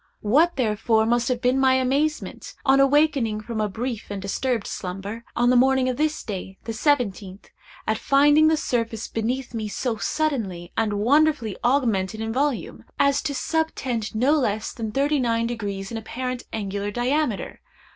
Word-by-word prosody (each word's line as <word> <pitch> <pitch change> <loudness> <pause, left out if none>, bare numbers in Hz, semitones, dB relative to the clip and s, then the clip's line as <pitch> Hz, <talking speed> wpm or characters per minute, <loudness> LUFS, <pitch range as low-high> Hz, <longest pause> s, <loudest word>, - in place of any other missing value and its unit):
What, 300 +11 +3
therefore, 220 -2 +1
must 240 +2 +1
have 250 -2 -1
been 250 +2 +3
my 260 -1 +4
amazement, 275 +4 -1
on 270 0 +5
awakening 275 -6 +3
from 220 0 -4
a 210 - 0
brief 230 +2 -4
and 200 -1 -4
disturbed 225 +3 -1
slumber, 195 +5 -5
on 245 +1 +3
the - - +4
morning 260 +1 +4
of 250 - -2
this 305 0 0
day, 190 -2 -6
the 225 - -4
seventeenth, 210 - -1 0.3
at 220 0 0
finding 290 +3 +5
the 315 0 +3
surface 230 -5 -2
beneath 240 +3 -3
me 220 -2 -3
so 225 +2 -2
suddenly 210 - -2
and 220 -2 0
wonderfully 250 0 +2
augmented 225 -6 +1
in 225 0 -3
volume, 275 0 -1
as 280 0 +3
to 290 -3 -3
subtend 260 -9 -2
no 250 +6 +3
less 220 -8 0
than 220 -2 -4
thirty 285 +4 +1
nine 230 -2 +1
degrees 205 -4 -4
in 230 - -3
apparent 250 +3 -5
angular 205 -1 -3
diameter! 245 +1 -1
240 Hz, 165 wpm, -24 LUFS, 215-275 Hz, 0.3 s, on